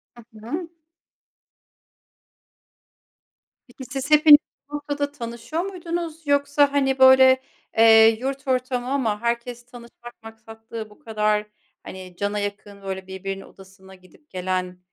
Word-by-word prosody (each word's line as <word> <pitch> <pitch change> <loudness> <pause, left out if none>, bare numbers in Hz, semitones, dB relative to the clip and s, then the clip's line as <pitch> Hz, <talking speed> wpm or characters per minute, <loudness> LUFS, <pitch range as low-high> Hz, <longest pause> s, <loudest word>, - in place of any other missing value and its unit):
Hı 225 -2 -16
hı. 330 +5 -4 3.0
Peki, 255 +1 -12
siz 270 +3 -6
hepiniz 300 -1 +9 0.3
bu 295 - -6
noktada 290 -1 -3
tanışıyor 240 +5 -5
muydunuz, 335 -4 -6
yoksa, 285 0 +2
hani, 270 -2 +1
böyle, 260 0 +7 0.4
eee, 225 0 +7
yurt 270 +1 -5
ortamı 255 -1 -1
ama 230 -7 -1
herkes 235 +1 -3
tanışmak 240 -1 -14
maksatlı 225 0 -10
bu 210 - -20
kadar, 215 -1 -1 0.4
hani, 185 -1 -10
cana 205 +1 -2
yakın, 205 0 -6
böyle, 190 -1 -6
birbirinin 195 +1 -6
odasına 190 0 -17
gidip 185 +11 -23
gelen, 185 -1 -3
235 Hz, 115 wpm, -23 LUFS, 210-280 Hz, 3.0 s, hepiniz